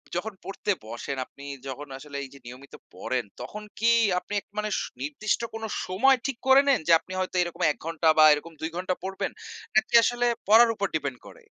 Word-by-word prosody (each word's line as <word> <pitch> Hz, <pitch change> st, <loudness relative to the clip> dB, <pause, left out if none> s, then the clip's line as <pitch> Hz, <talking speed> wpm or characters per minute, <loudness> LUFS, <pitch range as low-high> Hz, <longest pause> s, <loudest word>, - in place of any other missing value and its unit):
যখন 210 Hz, +5 st, -3 dB
পড়তে 195 Hz, +1 st, -2 dB
বসেন 120 Hz, +5 st, -5 dB
আপনি 140 Hz, -, -14 dB, 0.2 s
যখন 140 Hz, +2 st, -6 dB
আসলে 140 Hz, +1 st, -8 dB
এই 135 Hz, -, -8 dB
যে 140 Hz, -, -14 dB
নিয়মিত 130 Hz, +3 st, -12 dB, 0.2 s
পড়েন, 130 Hz, -1 st, -2 dB, 0.2 s
তখন 210 Hz, 0 st, -7 dB, 0.2 s
কি 230 Hz, +2 st, +4 dB, 0.3 s
আপনি 180 Hz, +3 st, -9 dB
এক -, -, -38 dB
মানে 210 Hz, 0 st, -1 dB, 0.3 s
নির্দিষ্ট 150 Hz, -, -1 dB
কোনো 225 Hz, 0 st, -4 dB, 0.2 s
সময় 255 Hz, +9 st, +4 dB
ঠিক 270 Hz, -4 st, -2 dB
করে 265 Hz, +1 st, +8 dB
নেন? 275 Hz, -, +4 dB
যে -, -, +4 dB
আপনি 185 Hz, -, -11 dB
হয়তো 185 Hz, 0 st, -3 dB
এরকম 175 Hz, +1 st, -7 dB
১ -, -, -8 dB
ঘন্টা 165 Hz, -1 st, -1 dB
বা 155 Hz, -, +8 dB
এরকম 155 Hz, +3 st, -5 dB
২ 160 Hz, -, -2 dB
ঘন্টা 185 Hz, 0 st, -1 dB
পড়বেন 190 Hz, 0 st, -3 dB, 0.4 s
নাকি 220 Hz, +2 st, +2 dB
আসলে 245 Hz, +1 st, +1 dB, 0.2 s
পড়ার 225 Hz, +3 st, +7 dB
উপর 200 Hz, -1 st, -1 dB
ডিপেন্ড 140 Hz, -5 st, -2 dB
করে? -, -, -15 dB
180 Hz, 195 wpm, -26 LUFS, 145-215 Hz, 0.4 s, করে